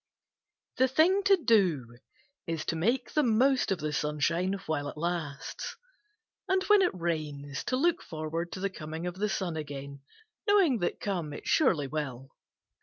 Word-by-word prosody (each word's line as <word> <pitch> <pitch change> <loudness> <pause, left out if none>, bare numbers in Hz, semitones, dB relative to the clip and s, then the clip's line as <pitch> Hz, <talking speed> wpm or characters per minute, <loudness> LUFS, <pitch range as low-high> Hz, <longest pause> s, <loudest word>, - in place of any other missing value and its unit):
The 260 - +5
thing 330 +9 +4
to 395 -1 +6
do 175 - +2 0.5
is 165 -1 -2
to - - -1
make 230 +11 0
the 305 - +4
most 255 -1 +3
of 190 - +2
the 150 -1 -3
sunshine 150 +6 0
while 145 -2 -1
it - - -7
lasts, 165 -2 -4 0.7
and 380 0 +2
when 415 0 +5
it 365 - +4
rains 150 -5 -3
to 255 - 0
look 340 +4 +2
forward 160 +1 -4
to - - -5
the 195 +1 -1
corning 160 -1 -6
of 180 - -2
the 205 +3 -1
sun 180 -4 -2
again, 140 -2 -6 0.5
knowing 375 - +4
that 175 - -1
conic 170 -8 -3
it - - -11
surely 180 - +3
will. 135 -3 -4
170 Hz, 165 wpm, -29 LUFS, 150-245 Hz, 0.7 s, to